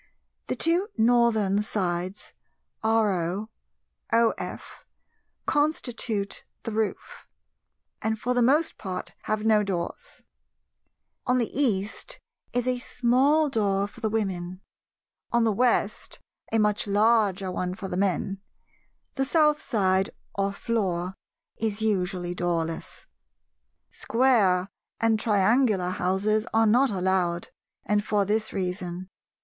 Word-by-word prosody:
The -, -, -1 dB
two 345 Hz, +4 st, +2 dB
Northern 220 Hz, -4 st, +3 dB
sides 185 Hz, -2 st, -3 dB, 0.5 s
RO, 210 Hz, -3 st, +1 dB, 0.6 s
OF, 230 Hz, 0 st, -1 dB, 0.6 s
constitute 245 Hz, -8 st, -1 dB, 0.2 s
the 230 Hz, -, -4 dB
roof, 220 Hz, -1 st, -3 dB, 0.7 s
and 220 Hz, 0 st, 0 dB
for 250 Hz, +3 st, 0 dB
the 245 Hz, -, +2 dB
most 290 Hz, +7 st, +2 dB
part 185 Hz, -3 st, -5 dB
have 215 Hz, 0 st, -1 dB
no 215 Hz, -1 st, +5 dB
doors; 200 Hz, -, -4 dB, 1.0 s
on 250 Hz, 0 st, +3 dB
the 235 Hz, -3 st, 0 dB
East 245 Hz, -, -1 dB, 0.3 s
is 245 Hz, 0 st, -1 dB
a 250 Hz, -1 st, +1 dB
small 260 Hz, +6 st, +2 dB
door 200 Hz, -6 st, +1 dB
for 235 Hz, +3 st, -15 dB
the 220 Hz, -, 0 dB
Women; 185 Hz, -4 st, -2 dB, 0.7 s
on 235 Hz, 0 st, +3 dB
the 225 Hz, -, +3 dB
West 215 Hz, -1 st, 0 dB, 0.3 s
a 225 Hz, -, +3 dB
much 210 Hz, -1 st, +1 dB
larger 205 Hz, -2 st, +2 dB
one 180 Hz, 0 st, -2 dB
for 195 Hz, -1 st, -6 dB
the 180 Hz, -, -4 dB
Men; 195 Hz, +1 st, -1 dB, 0.7 s
the 270 Hz, -, 0 dB
South 300 Hz, +1 st, +3 dB
side 190 Hz, -5 st, +1 dB, 0.2 s
or 195 Hz, 0 st, 0 dB
floor 190 Hz, -5 st, -1 dB, 0.4 s
is 220 Hz, -1 st, -1 dB
usually 180 Hz, -4 st, 0 dB
doorless. 170 Hz, -2 st, -3 dB, 0.9 s
Square 215 Hz, -8 st, +2 dB, 0.3 s
and 225 Hz, -1 st, +2 dB
triangular 210 Hz, -2 st, +2 dB
houses 205 Hz, +4 st, 0 dB
are 225 Hz, 0 st, +5 dB
not 245 Hz, +5 st, +4 dB
allowed, 185 Hz, -3 st, 0 dB, 0.4 s
and 205 Hz, 0 st, +1 dB
for 210 Hz, -2 st, +1 dB
this 215 Hz, +2 st, 0 dB
reason. 180 Hz, -1 st, -3 dB
210 Hz, 115 wpm, -26 LUFS, 190-235 Hz, 1.0 s, no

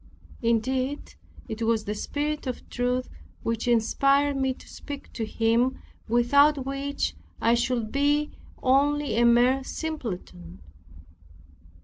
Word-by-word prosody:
Indeed 255 Hz, +4 st, 0 dB, 0.3 s
it 220 Hz, -1 st, -6 dB
was 225 Hz, -1 st, +1 dB
the 210 Hz, -, -2 dB
Spirit 295 Hz, +6 st, -3 dB
of 250 Hz, -, -5 dB
truth 250 Hz, +1 st, 0 dB, 0.4 s
which 230 Hz, +1 st, -2 dB
inspired 275 Hz, +5 st, +3 dB
me 265 Hz, -1 st, +1 dB
to 255 Hz, -, -10 dB
speak 285 Hz, -1 st, -9 dB
to 230 Hz, -, -3 dB
him, 230 Hz, +4 st, +1 dB, 0.3 s
without 270 Hz, +4 st, +4 dB
which 275 Hz, +1 st, -2 dB, 0.3 s
I 230 Hz, -, +3 dB
should 240 Hz, -2 st, 0 dB
be 290 Hz, +2 st, +1 dB, 0.3 s
only 285 Hz, 0 st, +2 dB
a 235 Hz, -, +4 dB
mere 245 Hz, +3 st, +4 dB
simpleton. 190 Hz, -, -6 dB
255 Hz, 115 wpm, -26 LUFS, 230-280 Hz, 0.4 s, without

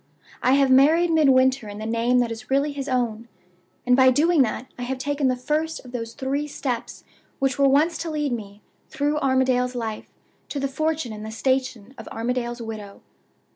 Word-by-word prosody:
I 255 Hz, -, +3 dB
have 275 Hz, -1 st, +4 dB
married 315 Hz, +6 st, +5 dB
Midwinter 260 Hz, -6 st, +3 dB
in 205 Hz, -, -8 dB
the 215 Hz, -, -6 dB
name 230 Hz, +2 st, +1 dB
that 235 Hz, -1 st, -1 dB
is 225 Hz, +1 st, -8 dB
really 280 Hz, +2 st, +1 dB
his 280 Hz, 0 st, -5 dB
own. 235 Hz, -3 st, -1 dB, 0.6 s
And 250 Hz, 0 st, +4 dB
by 260 Hz, 0 st, +6 dB
doing 305 Hz, +4 st, +3 dB
that 240 Hz, 0 st, -1 dB
I -, -, -9 dB
have 255 Hz, +2 st, -3 dB
taken 285 Hz, +1 st, -1 dB
the 255 Hz, -, +2 dB
first 300 Hz, +4 st, -2 dB
of 250 Hz, -, -11 dB
those 230 Hz, -2 st, -5 dB
three 275 Hz, +3 st, -2 dB
steps 255 Hz, -5 st, -4 dB, 0.3 s
which 270 Hz, 0 st, -1 dB
were 275 Hz, -1 st, +5 dB
once 310 Hz, +5 st, +2 dB
to 335 Hz, -, -4 dB
lead 300 Hz, -3 st, -1 dB
me, 205 Hz, -3 st, -6 dB, 0.3 s
through 295 Hz, +1 st, -1 dB
Armadale's 260 Hz, -2 st, +1 dB
life, 225 Hz, -3 st, -5 dB, 0.4 s
to 285 Hz, -, -3 dB
the 275 Hz, -, 0 dB
fortune 305 Hz, -3 st, -2 dB
and 215 Hz, 0 st, -8 dB
the 220 Hz, -, -6 dB
station 255 Hz, -1 st, -2 dB
of 225 Hz, -, -9 dB
Armadale's 240 Hz, +1 st, -3 dB
widow. 215 Hz, -3 st, -8 dB
260 Hz, 190 wpm, -23 LUFS, 235-285 Hz, 0.6 s, by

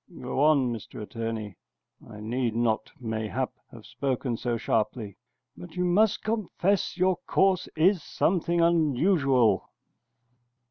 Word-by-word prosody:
Go 125 Hz, +1 st, -4 dB
on, 140 Hz, -5 st, +4 dB
Mr 115 Hz, -, -8 dB
Attorney. 110 Hz, -2 st, -5 dB, 0.5 s
I 105 Hz, -, -10 dB
need 115 Hz, +1 st, -1 dB
not, 115 Hz, -2 st, 0 dB
mayhap, 110 Hz, +2 st, -3 dB, 0.2 s
have 115 Hz, -2 st, -13 dB
spoken 130 Hz, -3 st, -2 dB
so 120 Hz, 0 st, -2 dB
sharply, 110 Hz, -2 st, -1 dB, 0.4 s
but 175 Hz, -1 st, -11 dB
you 180 Hz, 0 st, 0 dB
must 205 Hz, +4 st, +2 dB
confess 205 Hz, -4 st, 0 dB
your 185 Hz, -1 st, +2 dB
course 190 Hz, -2 st, +2 dB
is 175 Hz, +3 st, +3 dB
something 170 Hz, +2 st, 0 dB
unusual. 150 Hz, -, +3 dB
130 Hz, 120 wpm, -27 LUFS, 115-175 Hz, 0.5 s, on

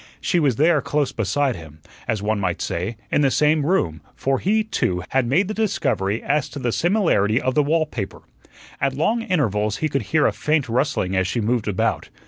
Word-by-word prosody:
She 175 Hz, -, +1 dB
was 140 Hz, -7 st, +2 dB
there 155 Hz, +3 st, +3 dB
close 145 Hz, -2 st, 0 dB
beside 125 Hz, +5 st, 0 dB
him; 80 Hz, -2 st, -12 dB, 0.3 s
as 105 Hz, -2 st, -1 dB
one 110 Hz, 0 st, 0 dB
might 100 Hz, -, -1 dB
say, 95 Hz, +7 st, -3 dB
in -, -, +3 dB
the 140 Hz, -, +4 dB
same 150 Hz, +2 st, +2 dB
room; 90 Hz, -, 0 dB
for 135 Hz, 0 st, 0 dB
he, 215 Hz, +3 st, +2 dB
too, 95 Hz, -, -1 dB
had 130 Hz, -2 st, +1 dB
made 180 Hz, +9 st, +3 dB
the 215 Hz, -, -3 dB
discovery 115 Hz, -, -1 dB
as 145 Hz, 0 st, 0 dB
to -, -, -9 dB
the 125 Hz, -3 st, -1 dB
similarity 160 Hz, -, +2 dB
of 130 Hz, -, -1 dB
the 150 Hz, -, +4 dB
wallpaper. 150 Hz, -8 st, -2 dB, 0.6 s
At 135 Hz, -1 st, 0 dB
long 220 Hz, -, +1 dB
intervals 105 Hz, -, 0 dB
he 155 Hz, -, -1 dB
could 140 Hz, -1 st, 0 dB
hear 160 Hz, -1 st, +3 dB
a -, -, +3 dB
faint 150 Hz, -3 st, 0 dB
rustling 120 Hz, -6 st, 0 dB
as 95 Hz, 0 st, +1 dB
she 120 Hz, -, -1 dB
moved 115 Hz, 0 st, 0 dB
about. 100 Hz, -3 st, -1 dB
135 Hz, 200 wpm, -22 LUFS, 105-155 Hz, 0.6 s, the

